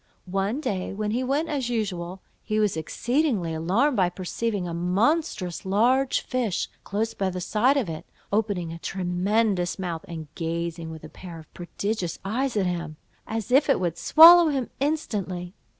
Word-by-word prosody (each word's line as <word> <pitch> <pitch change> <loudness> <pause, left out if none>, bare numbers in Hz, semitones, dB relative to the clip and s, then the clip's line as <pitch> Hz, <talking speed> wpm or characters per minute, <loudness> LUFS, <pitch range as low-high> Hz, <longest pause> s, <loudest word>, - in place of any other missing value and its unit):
One 195 +7 -1
day, 190 -11 -2
when 210 0 -2
he 245 +4 0
went 280 +5 0
as 270 -5 -2
usual, 190 -5 -3 0.2
he 215 0 -1
was 210 -4 +2
exceedingly 230 - 0
alarmed 200 - +1
by 185 -2 +3
perceiving 190 +2 -3
a 170 - -4
monstrous 185 - 0
large 245 +7 +2
fish, 240 -7 -1 0.2
close 220 +3 -2
by 195 -1 -1
the 185 0 -4
side 220 +9 +2
of 255 -8 0
it, 160 -1 -6 0.3
opening 200 -6 0
a 165 - -8
tremendous 185 +1 0
mouth, 175 -4 -4
and 160 -3 -7
gazing 165 0 -3
with 160 -1 -9
a 155 - -9
pair 175 -1 -10
of 160 -2 -14
prodigious 185 0 -3
eyes 240 +4 -1
at 195 - +2
him, 170 -3 -3 0.3
as 225 +1 -4
if 275 +3 +4
it 275 - +4
would 175 -3 -1
swallow 340 +2 +9
him 270 -5 -1
instantly. 200 - -2
195 Hz, 165 wpm, -25 LUFS, 175-245 Hz, 0.3 s, swallow